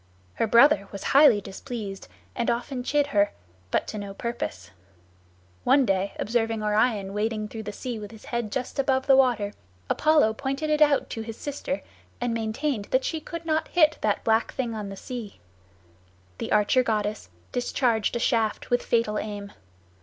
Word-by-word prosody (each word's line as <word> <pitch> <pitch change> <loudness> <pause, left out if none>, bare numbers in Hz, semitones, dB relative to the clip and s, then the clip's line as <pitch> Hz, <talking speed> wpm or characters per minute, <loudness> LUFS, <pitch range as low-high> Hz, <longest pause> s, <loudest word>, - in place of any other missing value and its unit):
Her 225 - 0
brother 230 -3 +5
was 200 - -7
highly 270 -7 +7
displeased 200 -1 -7 0.3
and 235 -1 0
often 245 +2 -2
chid 290 +2 +2
her, 205 -1 +3 0.4
but - - +1
to 215 - -4
no 200 -1 -7
purpose. 105 - -5 0.9
One 275 -2 +5
day, 195 -1 0
observing 225 -1 0
Orion 210 -2 +1
wading 215 0 -1
through 225 - -6
the 210 -1 -5
sea 235 +2 -5
with 205 -1 -7
his 220 -2 -13
head 235 -3 -3
just 260 +3 -4
above 265 -1 +2
the 270 - +6
water, 240 -6 +3 0.4
Apollo 300 -8 +4
pointed 275 +6 -2
it 305 0 +2
out 295 -2 +4
to 225 - -4
his 220 0 -7
sister 285 0 -4 0.4
and 245 -1 -1
maintained 225 +1 -2
that 260 +4 +1
she 320 - -1
could 335 +1 -7
not 315 -1 0
hit 315 -3 +3
that 210 -1 0
black 225 0 +2
thing 245 -4 -2
on 210 -2 -5
the 195 - -8
sea. 235 -4 -7 1.0
The - - -4
archer 210 +5 +4
goddess 215 - -2 0.2
discharged 240 -3 0
a - - 0
shaft 230 -3 0
with 245 - +3
fatal 230 -3 +1
aim. 205 -1 -6
230 Hz, 170 wpm, -26 LUFS, 210-265 Hz, 1.0 s, highly